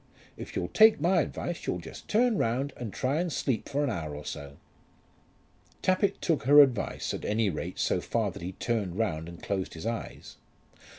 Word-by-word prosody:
If - - -9
you'll - - -2
take 220 -4 +6
my 175 +3 +3
advice 175 +2 -4
you'll - - 0
just 85 - -10
turn 235 0 +3
round 130 +5 0
and 120 -4 -6
try 135 - 0
to 180 - -1
sleep 130 -7 -2
for 145 +1 0
an 140 - 0
hour 80 -7 -4
or 75 0 -8
so." 70 -2 -7 1.3
Tappitt 185 +2 +2
took 165 -7 +1
her 145 +2 +8
advice 130 -7 +1
at - - -5
any 105 -1 +1
rate, 75 - -5
so - - +1
far - - -1
that - - -10
he 90 +2 -5
turned 100 -5 -2
round 85 -7 -1
and 85 0 -12
closed 95 -3 -2
his 80 - -8
eyes. 115 0 -5
115 Hz, 190 wpm, -29 LUFS, 90-150 Hz, 1.3 s, her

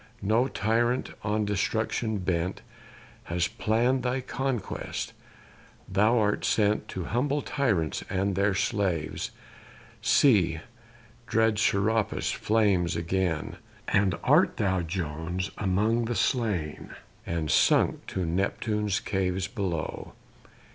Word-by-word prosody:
No 110 +6 +3
tyrant, 120 +2 0
on 105 0 0
destruction 110 +2 -1
bent, 90 -1 -1 0.6
Has 85 0 0
plann'd 120 +4 +1
thy 125 +1 -1
conquest 135 -3 -3 0.7
thou 105 +5 +3
art 105 -2 +1
sent 105 -1 +2
To 95 - -5
humble 140 - 0
tyrants 100 - 0
and 95 +1 0
their 100 +1 +1
slaves. 95 -6 -1 0.7
See! 90 - +4 0.7
dread 110 -1 +2
Serapis 105 +1 +1
flames 100 -6 +1
again 85 -1 -1 0.3
And 100 -2 +2
art - - +4
thou, 95 -2 +1
Jones, 85 +2 -3
among 105 +5 +1
the 120 +1 -2
slain, 100 - -1 0.3
And 80 -3 -1
sunk - - +3
to 95 - -2
Neptune's 100 +3 0
caves 95 -1 -1
below? 95 -8 -4
100 Hz, 105 wpm, -27 LUFS, 90-110 Hz, 0.7 s, See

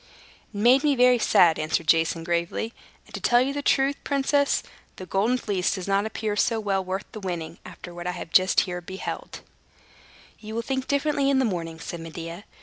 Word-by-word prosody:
"It 205 - -9
made 245 +6 +5
me 290 -2 +3
very 250 -1 +5
sad," 170 -6 +4
answered 155 +2 -1
Jason, 165 0 +2
gravely. 170 +7 -2 0.3
"And, - - -19
to - - -6
tell 240 - +4
you 265 +3 +1
the 285 - -3
truth, 275 0 +2
princess, 280 0 +1 0.3
the 185 - -8
Golden 205 +8 +1
Fleece 200 -6 -1
does 185 -1 -6
not 200 +2 +1
appear 220 -1 -3
so 225 +2 +1
well 195 -3 0
worth 185 +2 -4
the 215 - -8
winning, 170 -4 -5
after 175 -1 -10
what 175 0 -6
I - - 0
have 175 -2 -8
here 185 -1 +3
beheld!" 190 +2 -6 1.0
"You 215 0 -8
will 230 - -2
think 265 +1 -3
differently 280 -1 +1
in 275 - +3
the 265 - +3
morning," 165 -6 -3
said 170 +1 -6
Medea. 165 +3 -8
200 Hz, 195 wpm, -25 LUFS, 175-250 Hz, 1.0 s, made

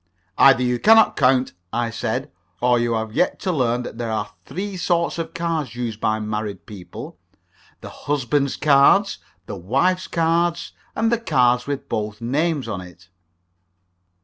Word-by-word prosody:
"Either 135 -2 +6
you 125 -1 0
cannot 225 0 +6
count," 130 0 +2 0.2
I 115 0 -1
said, 115 0 -3 0.3
"or 125 0 +3
you 120 0 0
have 110 -1 -3
yet 180 - +1
to 190 - -1
learn 125 -6 0
that 115 - -8
there 115 -1 -3
are 105 -1 -3
three 195 +1 -5
sorts 170 -1 0
of 165 0 -5
cards 165 -7 -2
used 115 -3 -4
by 110 0 +1
married 105 -2 -4
people 90 -3 -10 0.6
the - - -8
husband's 140 -1 -1
cards, 150 +8 +4 0.3
the 105 - -6
wife's 140 - 0
cards, 170 +1 0 0.2
and 225 +1 +1
the 235 - +2
card 125 - +2
with 145 -1 -4
both 105 -2 -3
names 145 +5 -1
on 95 - -4
it." 90 0 -14
125 Hz, 155 wpm, -21 LUFS, 110-165 Hz, 0.6 s, Either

